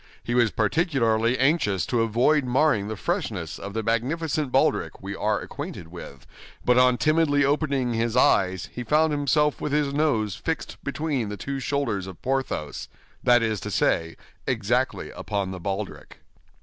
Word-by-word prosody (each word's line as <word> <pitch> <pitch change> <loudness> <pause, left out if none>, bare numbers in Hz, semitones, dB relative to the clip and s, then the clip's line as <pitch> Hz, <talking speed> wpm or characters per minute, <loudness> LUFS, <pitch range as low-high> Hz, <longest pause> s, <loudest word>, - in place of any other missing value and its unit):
He 120 - -3
was 120 -2 +4
particularly 115 - +1
anxious 130 - +2
to 120 -2 0
avoid 120 +7 +3
marring 125 -4 +2
the 110 - -4
freshness 105 - -3
of 100 +1 -7
the 115 - -1
magnificent 140 +5 -1
baldric - - +1
we - - -6
are - - 0
acquainted 80 - -7
with; 85 -6 -10 0.4
but 125 0 +5
on 125 -1 +4
timidly 155 -2 +3
opening 140 -4 0
his 115 +1 0
eyes, 95 -7 +3
he 125 - -5
found 155 +6 +3
himself 145 +1 +1
with 145 - -2
his 145 -2 +1
nose 130 -9 +1
fixed 160 -1 -4
between 140 -6 -2
the 105 - -5
two 140 +4 -4
shoulders 135 -9 -1
of 95 -3 -10
Porthos—that 125 - -1
is 110 -2 0
to - - -6
say, 80 0 +1 0.3
exactly - - 0
upon 100 -2 -3
the 95 - -6
baldric. 95 +3 -5
125 Hz, 155 wpm, -25 LUFS, 105-145 Hz, 0.4 s, but